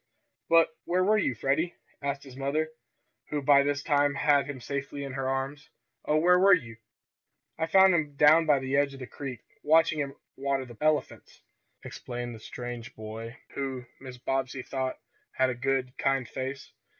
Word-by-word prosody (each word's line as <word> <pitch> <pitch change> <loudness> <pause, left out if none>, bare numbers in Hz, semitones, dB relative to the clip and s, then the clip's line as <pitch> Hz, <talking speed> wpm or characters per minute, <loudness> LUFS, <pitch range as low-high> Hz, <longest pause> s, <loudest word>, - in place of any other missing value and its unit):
"But 165 0 +6 0.2
where 180 +1 +2
were 215 +3 +4
you, 135 - 0
Freddie?" 140 +9 0 0.3
asked 140 0 -3
his 135 -3 -12
mother, 145 +4 -1 0.6
who 150 - -1
by 140 0 +5
this 145 0 -1
time 145 -2 +2
had 145 -1 +3
him 140 -2 -5
safely 140 +2 -4
in 140 - -5
her 135 0 -2
arms. 135 +3 -3 0.4
"Oh, 150 - +2
where 180 +3 +5
were 195 +1 +7
you?" 120 -9 -7 0.8
"I 160 - 0
found 190 +2 +6
him 150 -4 0
down 155 +3 +6
by 145 -2 +5
the 130 0 -2
edge 140 -1 +2
of - - -12
the 130 - -6
creek, 130 -3 -7 0.2
watching 160 0 +4
'em 140 -1 -4 0.2
water 135 -1 -1
the 120 -1 -12
elephants," 155 -1 -1 0.4
explained 120 -1 -6
the 110 - -10
strange 120 +1 -7
boy, 110 +2 -8
who, 135 -2 -4 0.2
Mrs. 125 -2 -11
Bobbsey 135 -1 -1
thought, 130 0 -3 0.4
had 130 0 +2
a - - -2
good, 130 0 -1
kind 135 -3 +1
face. 135 +3 -6
140 Hz, 175 wpm, -28 LUFS, 130-150 Hz, 0.8 s, were